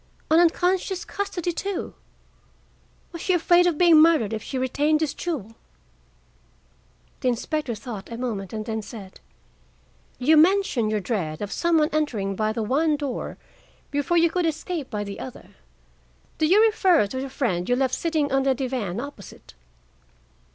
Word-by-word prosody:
An 320 - +6
unconscious 360 +3 +1
custody, 380 -4 -3
too? 395 +3 -4 1.2
Was 335 -2 -8
she 370 - +1
afraid 350 +1 +4
of 340 -4 0
being 335 -3 +7
murdered 310 -10 +4
if 220 - -3
she 265 - -5
retained 290 +4 +1
this 310 -3 -1
jewel?" 285 - -4 1.7
The - - -2
inspector 250 +1 -1
thought 215 -2 -8
a 230 - -5
moment, 215 -6 -4
and 215 -1 -5
then 220 0 -3
said: 205 -3 -11 1.0
"You 305 +5 +4
mention 335 - +3
your 215 -1 -1
dread 180 -7 -3
of 205 0 -5
some 340 -1 +1
one 305 0 +3
entering 225 -11 -1
by 215 +2 0
the 220 0 -2
one 295 +7 +1
door 285 -4 -4 0.5
before 290 +4 0
you 335 -1 +4
could 355 -1 0
escape 320 -2 -4
by 210 -1 -3
the 200 -1 -7
other. 255 - -9 0.9
Do 310 - +3
you 405 +6 +5
refer 380 - +3
to 260 +6 -5
the 270 - -5
friend 205 -9 -2
you 245 - +3
left 260 0 0
sitting 310 -1 0
on 270 0 +2
the 265 -1 +2
divan 245 -7 -3
opposite?" 240 - -10
275 Hz, 160 wpm, -24 LUFS, 220-330 Hz, 1.7 s, being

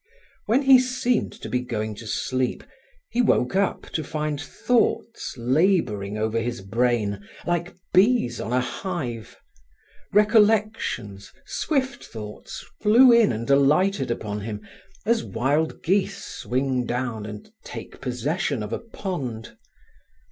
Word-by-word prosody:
When 245 +6 +3
he 265 -1 +8
seemed 250 -1 0
to - - -4
be 125 - 0
going 110 -3 -3
to 115 - -9
sleep, 130 +3 -1 0.5
he 245 - +2
woke 155 - +2
up 195 0 +1
to 155 - -2
find 150 -1 -3
thoughts 230 +4 0
labouring 120 - +1
over 110 +1 0
his 120 -1 -3
brain, 105 -1 0 0.2
like 175 0 -1 0.2
bees 185 - +3
on 110 - -4
a 125 +1 +3
hive. 125 - -5 0.7
Recollections, 210 - +2
swift 265 -5 -1
thoughts, 105 -2 -8 0.2
flew 235 +4 +7
in 235 - +6
and 115 +1 -4
alighted 145 +3 +3
upon 105 -3 -3
him, 105 0 -6 0.4
as 230 0 +2
wild 145 +7 0
geese 190 +3 +1
swing 130 -1 -1
down 120 -4 -2
and 105 - -9
take - - -9
possession 135 - -1
of 105 +2 -5
a - - -1
pond. 160 - -5
135 Hz, 125 wpm, -24 LUFS, -, 0.7 s, he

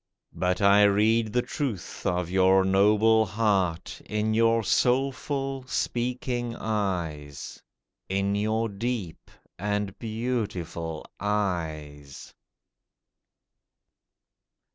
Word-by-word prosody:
But 90 +2 -1
I 100 +1 +6
read 110 +2 +3
the 125 +2 +1
truth 115 - -4
of 90 -1 0
your 95 0 +4
noble 105 +3 +4
heart 95 -5 0
In 105 +1 0
your 115 0 +3
soulful, 135 +3 0
speaking 120 -1 -2
eyes— 85 -9 -3 0.5
In 100 +1 0
your 110 +2 0
deep 105 -4 -4 0.3
and 105 0 -2
beautiful 105 -9 -3
eyes. 80 -9 -3
105 Hz, 80 wpm, -26 LUFS, 95-115 Hz, 0.5 s, I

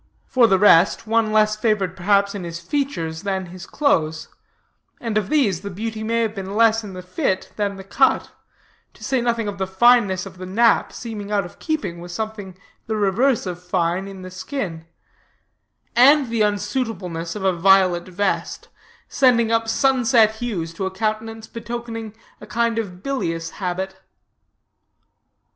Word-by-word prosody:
For 245 -3 +4
the 195 - +4
rest, 195 +2 +5
one 225 0 +1
less 215 0 +3
favored 215 -4 0
perhaps 200 +2 +2
in 200 -3 -5
his 170 -1 -6
features 170 - -3
than 190 -2 -2
his 185 +1 -10
clothes; 160 - 0 0.7
and 230 -3 -4
of 215 -2 0
these 225 - +2
the 200 - -6
beauty 220 +3 -5
may 230 +1 +1
have 220 -2 -2
been 195 -1 -6
less 225 0 +4
in 200 -2 -8
the 185 0 -8
fit 185 +1 -2
than 205 -1 -1
the 195 - -9
cut; 265 +7 +2 0.6
to - - -15
say 265 -2 0
nothing 235 -2 0
of 200 -1 -5
the 190 - -1
fineness 195 -2 +3
of 185 - -11
the 185 - -6
nap, 230 +5 +3
seeming 210 -4 -7
out 200 -3 +1
of 175 - -13
keeping 240 - -3
with 175 0 -9
something 205 -2 -5 0.3
the 220 - -1
reverse 215 +5 +2
of 180 -1 -6
fine 180 +1 -1
in 195 -1 -9
the 185 - -8
skin; 180 - -5 1.1
and 270 +1 +6
the 230 -1 0
unsuitableness 205 -5 -2
of 205 - -5
a 190 -1 +3
violet 185 0 +4
vest, 190 +2 -2 0.4
sending 235 -4 +3
up 225 0 +1
sunset 235 -4 +3
hues 190 -9 -4
to 190 +3 -3
a - - -2
countenance 220 +3 -3
betokening 230 -2 -6 0.3
a - - -10
kind 230 0 0
of 185 -4 -6
bilious 165 -12 -2
habit. 190 0 -4
205 Hz, 165 wpm, -21 LUFS, 185-230 Hz, 1.1 s, and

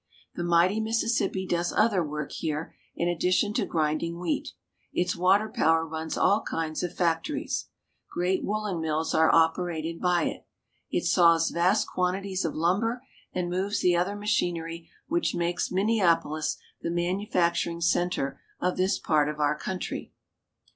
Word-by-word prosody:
The 175 - -4
mighty 175 +4 +3
Mississippi 220 -3 0
does 175 -1 0
other 215 -5 +3
work 150 -1 -4
here 155 -1 -3 0.2
in 170 - -1
addition 180 +4 +1
to - - 0
grinding 160 +1 -1
wheat. 290 - -2 0.4
Its 180 0 0
water 190 +4 +3
power 165 -6 +2
runs 160 0 -4
all 205 +2 +3
kinds 160 -1 -3
of 175 - -4
fac 165 -2 +1
tories. 300 +2 -3 0.5
Great 180 +2 0
woolen 205 -4 -2
mills 160 0 -1
are 160 0 +5
operated 165 0 +1
by 180 -2 +2
it. - - -4 0.4
It - - -1
saws 165 -1 +4
vast 185 +5 +2
quantities 190 +1 -1
of 165 - -2
lumber, 210 +10 0 0.3
and 180 -1 -2
moves 195 +3 -1
the 180 -1 +4
other 180 +4 0
machinery 170 -5 -2 0.2
which 345 +2 0
makes 175 +1 -1
Minneapolis 175 -6 +1 0.2
the - - -2
manufacturing 175 -1 0
center 170 -4 0 0.2
of 180 0 0
this 185 +2 +2
part 150 -2 +2
of 150 0 -5
our 150 0 +2
country. 185 +4 -5
175 Hz, 145 wpm, -27 LUFS, 165-190 Hz, 0.5 s, are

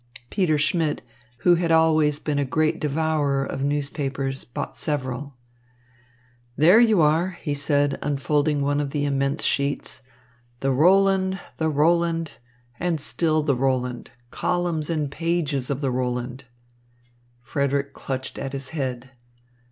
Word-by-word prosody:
Peter 180 -7 +2
Schmidt, 150 +1 0 0.4
who 175 - +7
had 170 -1 +1
always 155 -2 +4
been 150 -1 -2
a - - +2
great 155 +3 0
devourer 150 -2 0
of 135 - -4
newspapers, 140 -2 -2
bought 120 - -6
several. 140 -1 -3 1.2
"There 175 - +7
you 220 -6 +5
are," 165 +4 +2
he 145 - -2
said, 145 0 +1
unfolding 145 +1 0
one 145 +1 +1
of 145 - -3
the 145 0 -1
immense 140 0 0
sheets. 140 -1 -1 0.6
"The 135 - +1
Roland, 190 +5 +3 0.2
the 160 -1 0
Roland, 165 +2 +1 0.5
and 175 -3 0
still 155 +1 +2
the 140 -3 +1
Roland, 125 -1 -1 0.2
columns 175 -4 -1
and 150 -4 -1
pages 155 -5 -1
of 140 0 -2
the 135 -2 0
Roland." 125 +1 -3 1.0
Frederick 140 +1 -1
clutched 130 -1 -5
at 135 - -5
his 135 -1 -4
head. 130 -4 -4
145 Hz, 130 wpm, -24 LUFS, 135-160 Hz, 1.2 s, who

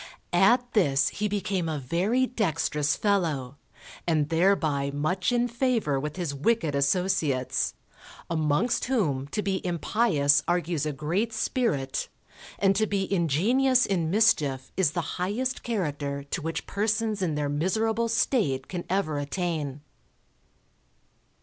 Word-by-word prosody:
At 240 +7 +3
this 140 -10 +3
he 210 - -2
became 195 -4 -1
a 155 - -2
very 185 - +1
dextrous 165 - 0
fellow, 155 -10 0 0.5
and 155 -3 +1
thereby 160 -5 +2
much 150 - -1
in 245 0 +2
favour 235 - 0
with 150 +2 -4
his 175 -6 -3
wicked 160 +1 0
associates, 140 -2 0 0.5
amongst 160 +7 +1
whom 155 - 0
to 210 +8 -3
be 190 -1 -1
impious 165 -5 +2
argues 175 -3 0
a - - -1
great 170 +11 -1
spirit, 220 - -1 0.5
and 195 -1 +3
to 215 0 +2
be 200 -1 -1
ingenious 230 - +3
in 170 -5 0
mischief 150 - +2
is 175 -6 +2
the 175 - 0 0.2
highest 245 +7 -1
character 145 -10 -3
to 170 - -2
which 165 +2 -4
persons 215 0 -1
in 165 -5 0
their 150 -1 -1
miserable 220 +10 0
state 215 - +1
can 175 -2 -5
ever 170 -6 0
attain. 150 -2 -3
175 Hz, 130 wpm, -27 LUFS, 145-215 Hz, 0.5 s, At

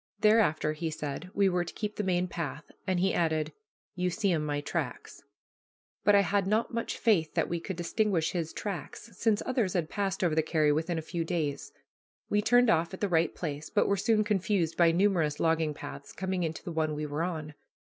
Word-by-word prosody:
Thereafter, 210 -9 +4
he 160 +1 -3
said, 150 +3 -5
we 200 -1 +4
were 180 -1 +1
to 175 - -8
keep 210 -1 -3
the 210 - -2
main 180 -1 +1
path, 155 -4 -5 0.2
and 185 -1 +1
he 190 +1 +2
added, 155 -2 0 0.4
"You 180 0 0
see 200 +2 0
'em 160 -3 +1
my 145 -1 -1
tracks." 145 - -4 0.8
But 205 - +5
I 200 - +7
had 200 0 +1
not 220 +4 +1
much 230 0 -2
faith 180 -9 +2
that - - +2
we 170 - -2
could 190 +3 -5
distinguish 175 -1 0
his 165 -3 -2
tracks, 205 +3 -6
since 220 +1 +1
others 235 -8 0
had 170 -3 -1
passed 195 -2 -1
over 170 -3 +2
the 160 - +3
carry 155 -1 +2
within 165 +3 0
a 160 - -3
few 165 +1 -3
days. 160 -4 -2 0.6
We 210 - +3
turned 245 +2 +5
off 165 +3 +1
at - - -14
the 205 - 0
right 165 -1 +2
place, 150 -2 -4
but 210 - +2
were 200 - +3
soon 215 +2 +2
confused 195 -5 0
by 170 -1 +5
numerous 170 -5 +2
logging 160 -2 +1
paths 140 0 -8
coming 185 0 -2
into 160 -2 -3
the 175 - -5
one 155 -2 0
we 150 0 -3
were 150 +2 -3
on. 160 -3 -3
175 Hz, 210 wpm, -29 LUFS, 160-200 Hz, 0.8 s, I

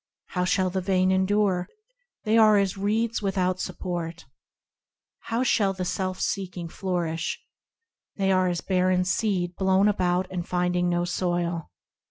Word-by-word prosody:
How 180 -1 -1
shall 185 +1 +1
the 190 +1 -1
vain 185 0 +2
endure? 190 -1 +1 0.5
They 215 0 +2
are 215 -2 +6
as 195 -1 +1
reeds 220 +4 0
without 185 -2 0
support. 170 -2 -4 0.9
How 230 +2 -2
shall 200 -6 +2
the 185 -1 -4
self 185 0 -2
seeking 180 -3 -3
flourish? 170 -3 -2 0.8
They 195 -1 +1
are 185 -1 +3
as 175 -2 -1
barren 185 -1 +1
seed 185 -3 0
blown 190 +1 +3
about 180 -2 +1
and 180 -2 -3
finding 180 0 +1
no 175 0 +1
soil. 175 -2 -2
185 Hz, 140 wpm, -26 LUFS, 180-195 Hz, 0.9 s, are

